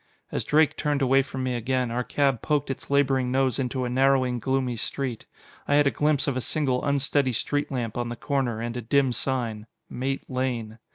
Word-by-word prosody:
As - - -1
Drake 155 0 +3
turned 145 -2 0
away 135 +1 +5
from 130 -1 -5
me 130 -1 -1
again, 125 +1 -1
our 125 +1 -1
cab 135 -3 +1
poked 145 -2 0
its 135 - -7
laboring 135 -3 +2
nose 130 -2 +1
into 130 0 -1
a - - -2
narrowing, 130 -1 +2
gloomy 130 0 0
street. 120 +1 -4 0.4
I 145 - +3
had 145 0 +5
a 140 - +3
glimpse 150 -1 +1
of 140 - 0
a 130 - -1
single 130 -3 0
unsteady 140 -1 +1
street 145 +6 -1
lamp 120 -4 -3
on 120 -1 -2
the 120 - -4
corner, 130 -4 -1
and 115 +1 -4
a 125 - -3
dim 135 +3 +2
sign, 115 -3 -2 0.2
"Mate 135 +2 -3
Lane." 120 -4 -3
130 Hz, 205 wpm, -26 LUFS, 120-140 Hz, 0.4 s, away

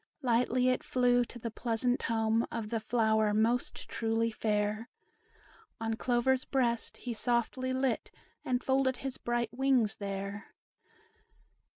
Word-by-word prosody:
Lightly 250 +1 +2
it 255 - 0
flew 245 -1 +3
to 240 - -11
the 230 -1 -5
pleasant 240 +2 0
home 225 0 +1
Of 225 -2 -4
the 230 0 -1
flower 220 -2 +2
most 230 +3 0
truly 225 0 0
fair, 215 +1 -1 0.9
On 225 0 -1
Clover's 250 +3 +1
breast 235 -4 0
he 245 - -5
softly 240 +3 0
lit, 260 -2 0 0.3
And 250 -1 -1
folded 265 -1 +2
his 270 -1 -5
bright 240 -1 -1
wings 255 -5 +2
there. 200 0 -5
235 Hz, 130 wpm, -31 LUFS, 220-250 Hz, 0.9 s, flew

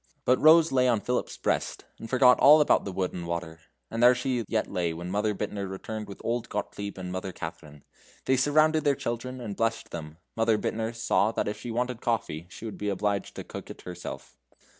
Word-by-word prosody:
But 125 - +4
Rose 160 +1 +7
lay 130 -1 +3
on 120 -3 +3
Philip's 125 +3 -2
breast, - - -1
and 115 - -8
forgot 125 -1 +5
all 150 +3 +8
about 150 - +3
the 100 - -3
wood 90 0 -2
and 85 -1 -5
water. 85 -1 -4 0.3
And 115 - -2
there 125 +1 +7
she 125 -1 -1
yet - - 0
lay 85 -2 -2
when 90 +2 -6
Mother 105 +1 0
Bittner 100 0 -4
returned 105 +3 -6
with 100 - -10
old 120 0 -1
Gottlieb 100 -1 -4
and 90 -1 -5
Mother 95 +1 -4
Katharine. 75 -4 -9 0.4
They 130 - +3
surrounded 155 +4 +3
their 140 -1 +3
children 125 -1 -4
and 110 -5 -5
blessed 115 +1 -1
them. 80 -2 -7 0.2
Mother 115 -1 +3
Bittner 110 +2 -2
saw 115 -2 +2
if 105 0 -1
she 120 - -7
wanted 125 +1 -2
coffee, 90 -8 -2
she 110 - -10
would 110 - -6
be 105 - -1
obliged 100 0 -1
to - - -6
cook - - -9
it - - -10
herself. 90 -1 -8
110 Hz, 205 wpm, -27 LUFS, 95-125 Hz, 0.4 s, all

